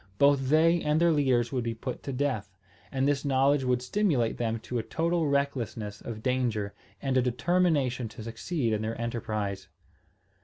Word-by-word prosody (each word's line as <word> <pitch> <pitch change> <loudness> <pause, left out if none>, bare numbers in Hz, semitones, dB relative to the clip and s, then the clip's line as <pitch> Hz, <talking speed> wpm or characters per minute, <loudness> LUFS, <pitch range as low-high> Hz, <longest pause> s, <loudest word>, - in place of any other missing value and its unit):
Both 140 0 +4
they 165 +3 +4
and 150 +1 +2
their 170 0 +4
leaders 130 -6 +2
would 125 -3 -1
be 115 -1 -2
put 125 +2 -5
to 140 - -5
death; 130 -7 -1 0.4
and 135 0 +1
this 145 -1 +1
knowledge 135 0 +3
would 125 -1 +1
stimulate 140 - +1
them 115 -1 0
to 125 +1 -3
a - - 0
total 165 +5 0
recklessness 130 -7 -2
of 110 -2 -7
danger 120 -6 0 0.3
and 135 -1 +1
a - - +5
determination 130 -1 +1
to 110 - -9
succeed 115 +2 -2
in 105 - 0
their 110 +1 -3
enterprise. 105 -4 -3
130 Hz, 175 wpm, -28 LUFS, 115-145 Hz, 0.4 s, a